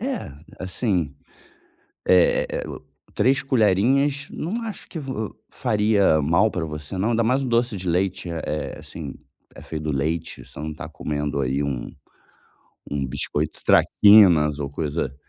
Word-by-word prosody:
É, 255 - -3 0.3
assim, 95 - -1 0.9
eh, 90 -1 +4 0.7
3 135 +3 +3
colherinhas 135 +5 +2
não 220 +9 -3
acho 220 - -7
que 165 - -7
v 135 -3 -5 0.4
faria 105 -6 +2
mal 85 +9 +3
pra 90 -5 -3
você 75 +3 -6
não, 105 +5 +1
ainda 115 0 +2
mais 130 +4 +2
o 130 - -2
doce 120 -2 +1
de 95 0 -4
leite, 90 +1 0
eh 85 -1 -4
eh, 75 - -3
assim, - - -8 0.4
é - - -11
feito 75 -1 -6
do 75 - -1
leite, 80 +4 -2
você - - -13
não 75 +1 -4
tá - - -8
comendo 75 -1 -3
aí 65 +2 0
um 65 -4 -3 1.0
um 70 -2 -1
biscoito 60 - -3
Traquinas 90 -8 +6
ou 70 - -2
coisa 75 -2 -3
95 Hz, 150 wpm, -23 LUFS, 75-120 Hz, 1.0 s, Traquinas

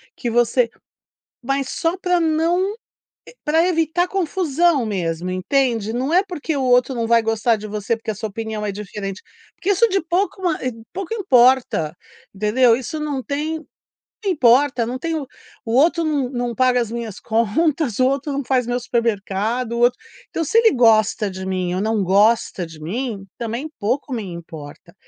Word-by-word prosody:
que 240 - -3
você 240 +1 +3 0.8
mas 275 +1 -1
só 330 +2 -1
para 360 -1 +1
não 325 +2 +2
ev 440 - -13 0.7
para 320 +2 +3
evitar 335 0 +1
confusão 345 -5 +1
mesmo, 180 -4 -2
entende. 225 +3 0
Não 255 +5 -1
é 370 +2 +5
porque 330 -5 -4
o 270 - -1
outro 250 +1 +3
não 230 -1 -1
vai 230 0 +4
gostar 225 +1 +1
de 215 0 -7
você 210 +2 -2
porque 225 0 -8
a - - -6
sua 215 +2 -4
opinião 220 0 -4
é 205 - -1
diferente, 200 -1 -6 0.3
porque 370 - -4
isso 405 +4 +4
de 390 0 +1
pouco 370 +4 -1 0.5
pouco 390 +2 -5
importa, 255 - +3 0.4
entendeu? 225 +4 +3
Isso 260 +5 -5
não 295 -3 -2
tem 300 +4 -2
pouco 310 - -18 0.6
importa 255 -6 +3
não 245 +2 -3
tem 330 +1 -2
o 290 -3 -4 0.4
outro 315 +9 +3
não 285 -5 0
não 245 -2 -3
paga 255 0 +3
as 230 -3 -2
minhas 230 -4 -5
contas, 235 +4 0
o 255 - +4
outro 275 +2 -1
não 280 0 -2
faz 255 -1 +1
meu 245 +1 -1
supermercado, 230 -1 -1
o 235 - -2
outro 245 +1 +3 0.3
então 330 - -2
se 320 - -1
ele 455 -1 +6
gosta 220 -4 +3
de 190 0 -7
mim 185 -2 -2
ou 185 - -1
não 215 0 0
gosta 200 0 +2
de 160 -2 -12
mim 205 +4 -4
também 235 +5 -4
pouco 255 +7 -1
me 230 - -3
importa. 165 -5 -10
245 Hz, 175 wpm, -20 LUFS, 215-305 Hz, 0.8 s, ele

